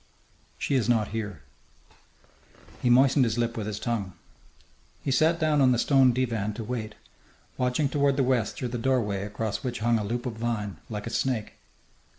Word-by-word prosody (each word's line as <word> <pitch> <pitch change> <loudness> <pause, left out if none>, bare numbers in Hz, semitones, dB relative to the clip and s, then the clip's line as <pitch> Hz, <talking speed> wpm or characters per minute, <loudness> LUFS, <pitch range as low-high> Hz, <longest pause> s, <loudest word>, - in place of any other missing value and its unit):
"She - - -2
is 125 -4 +2
not 110 -4 +2
here." 105 -8 -5 1.4
He 125 - +2
moistened 130 +2 +5
his 115 -1 0
lips 120 0 0
with 105 -2 -4
his 105 -1 -4
tongue. 105 -6 -2 0.9
He 135 - -1
sat 160 +6 +3
down 155 -3 +2
on 130 -1 +5
the - - +1
stone 135 +1 +4
divan 115 -4 -1
to 115 - -5
wait, 110 -2 -4 0.6
watching 125 +3 +1
toward 140 -1 +1
the 135 - +3
west 125 -4 +1
through 125 - -3
the 120 0 -4
doorway 115 -6 0
across 105 +1 -3
which 125 -2 -3
hung 115 0 +2
a - - -2
loop 120 +5 -3
of 125 - -2
vine, 105 -6 -2
like 105 -2 -5
a 115 - -5
snake. 120 -3 -1
120 Hz, 180 wpm, -27 LUFS, 110-130 Hz, 1.4 s, moistened